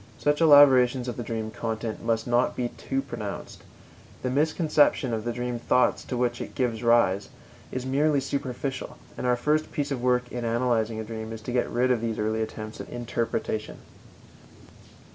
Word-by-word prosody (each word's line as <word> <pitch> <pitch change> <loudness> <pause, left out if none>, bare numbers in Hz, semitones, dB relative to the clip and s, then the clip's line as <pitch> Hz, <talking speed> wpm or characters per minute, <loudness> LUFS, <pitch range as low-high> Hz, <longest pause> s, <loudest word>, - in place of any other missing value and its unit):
Such 145 +2 +1
elaboration 135 -5 +6
of 120 - -3
the - - -5
dream 110 -2 -4
content 110 0 -4
must 115 -1 0
not 120 +1 +2
be 120 -1 -1
too 135 +2 -3
pronounced; 115 -7 -7 0.6
the 125 - -1
misconception 150 -3 +2
of 110 0 -3
the 120 - 0
dream 120 0 -3
thoughts 125 +2 +2
to 125 - -3
which 120 -1 0
it - - -7
gives 120 -4 -1
rise 115 -5 +3 0.4
is 130 0 -4
merely 145 +2 +2
superficial, 135 -1 -4 0.2
and - - -3
our 125 - +4
first 150 +5 0
piece 145 -1 -2
of 130 -3 -2
work 125 0 +1
in 120 -1 -4
analyzing 115 -1 0
a - - -3
dream 110 0 -6
is 115 -1 -7
to 125 - -4
get 125 0 0
rid 125 +2 +1
of 120 -3 +1
these 115 -1 -2
early 110 +1 0
attempts 110 0 -5
at - - -10
interpretation. 115 -2 -3
120 Hz, 180 wpm, -26 LUFS, 115-130 Hz, 0.6 s, elaboration